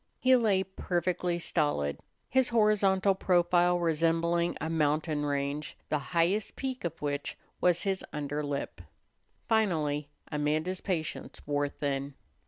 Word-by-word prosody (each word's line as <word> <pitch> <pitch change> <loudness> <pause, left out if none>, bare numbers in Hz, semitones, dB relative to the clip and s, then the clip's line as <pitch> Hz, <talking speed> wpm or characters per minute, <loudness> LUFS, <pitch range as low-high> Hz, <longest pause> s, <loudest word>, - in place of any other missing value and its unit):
He 260 0 +5
lay 210 -6 +3
perfectly 180 -2 -1
stolid, 145 - 0 0.3
his 260 -1 +2
horizontal 205 -4 +3
profile 175 -1 +3
resembling 170 +1 +1
a 160 - -3
mountain 155 -1 0
range 145 +1 -2
the 150 - +1 0.2
highest 190 +6 +2
peak 260 -1 -4
of 165 -1 -4
which 145 -1 -2 0.2
was 175 -1 +3
his 195 -2 -1
under 145 0 -3
lip. 140 -10 -4 0.7
Finally 155 -10 +1 0.2
Amanda's 155 +5 -1
patience 165 -5 -3
wore 145 0 0
thin. 140 -1 -3
165 Hz, 120 wpm, -30 LUFS, 150-190 Hz, 0.7 s, He